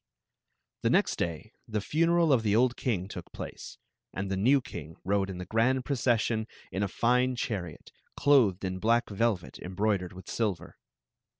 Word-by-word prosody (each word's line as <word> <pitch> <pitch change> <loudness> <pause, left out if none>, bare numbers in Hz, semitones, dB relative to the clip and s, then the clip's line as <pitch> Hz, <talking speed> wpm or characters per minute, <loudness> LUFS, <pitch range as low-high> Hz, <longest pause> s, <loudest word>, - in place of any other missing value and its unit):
The - - +2
next - - +2
day 85 +8 -3
the 110 -2 -1
funeral 165 +6 +3
of 125 - +3
the 105 -2 +1
old 125 +2 +3
king 100 -8 -1
took 100 - -9
place, - - -8 0.3
and 95 +1 -4
the - - +1
new 125 +9 +4
king 80 - -8
rode 100 0 +1
in 95 - -5
the 90 - -6
grand 120 +6 +1
procession 115 -4 +1 0.2
in 95 +1 -2
a 100 - +1
fine 125 +5 +2
chariot, 95 - -4 0.3
clothed 115 -10 +4
in 95 0 -3
black 115 +2 +2
velvet 100 -3 -1
embroidered 95 0 -1
with 95 0 -11
silver. 105 -8 -3
110 Hz, 165 wpm, -29 LUFS, 95-125 Hz, 0.3 s, new